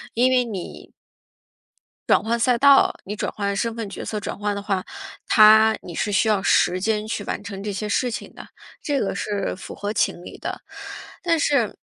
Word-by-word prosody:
因 255 +2 +3
为 250 -1 +3
你 200 -7 -8 1.2
转 - - +5
换 230 +2 -1
赛 245 +1 +3
道， 280 +2 +6
你 205 +2 -5
转 - - -3
换 200 -1 -2
身 230 +3 -2
份、 225 -3 -4
角 - - -7
色 215 - -4
转 - - -5
换 205 0 -2
的 200 - -4
话， 195 -2 -2 0.4
它 220 0 +7
你 175 - -9
是 210 - -1
需 205 +2 +2
要 210 -3 +2
时 185 -2 +3
间 215 +1 -1
去 210 -2 -3
完 205 - -4
成 195 -2 -7
这 210 - -3
些 210 +2 -4
事 245 +4 0
情 - - -7
的， - - -11 0.4
这 285 -2 -1
个 195 - -2
是 205 -3 -2
符 185 - -9
合 205 +1 -4
情 175 -2 0
理 - - -10
的， - - -6 0.6
但 335 -2 +2
是 265 -8 +1
215 Hz, 215 characters per minute, -22 LUFS, 200-230 Hz, 1.2 s, 它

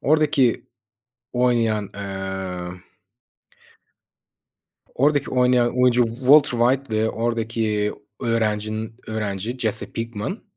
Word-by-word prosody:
oradaki 145 -4 +2 0.7
oynayan 115 -4 +1
emm 95 -2 -5 2.2
oradaki 145 +2 +2
oynayan 125 -1 +2
oyuncu 125 -1 +5
Walter 130 +1 +5
White 125 -1 +1
ve 110 +1 +1
oradaki 115 -2 -1 0.3
öğrencinin, 110 -1 -1
öğrenci 110 +2 -3
Jesse 110 -4 -3
Pinkman, 115 - -4
115 Hz, 80 wpm, -22 LUFS, 105-125 Hz, 2.2 s, oyuncu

